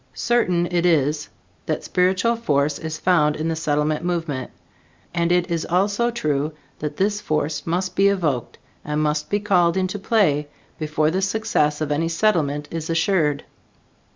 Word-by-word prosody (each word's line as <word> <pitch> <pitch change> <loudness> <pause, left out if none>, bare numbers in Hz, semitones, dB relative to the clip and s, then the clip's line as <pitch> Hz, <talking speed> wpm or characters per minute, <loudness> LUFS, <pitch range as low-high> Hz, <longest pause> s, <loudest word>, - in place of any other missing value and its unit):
Certain 180 -8 +1
it 175 -1 +2
is 150 -3 +1 0.4
that - - -1
spiritual 185 +6 +2
force 145 -9 0
is 160 -1 -5
found 150 -5 +3
in 160 +1 -2
the 165 - -1
Settlement 150 0 0
movement, 165 -7 -2 0.6
and 170 0 +1
it 180 0 +1
is 165 -1 0
also 200 +6 +1
true 150 -9 -1 0.3
that 150 -1 -4
this 205 +2 0
force 150 0 -2
must 180 +2 -1
be 195 +1 +4
evoked 165 -11 -1 0.3
and 150 0 -2
must 150 0 -1
be 205 - +1
called 180 -4 +2
into 185 +2 -1
play 170 -9 +2 0.3
before 155 0 +1
the 190 +3 0
success 195 -8 0
of 150 -1 -1
any 160 +3 +1
Settlement 160 -6 +1
is 165 -1 -4
assured. 165 -4 +1
165 Hz, 155 wpm, -22 LUFS, 150-185 Hz, 0.6 s, be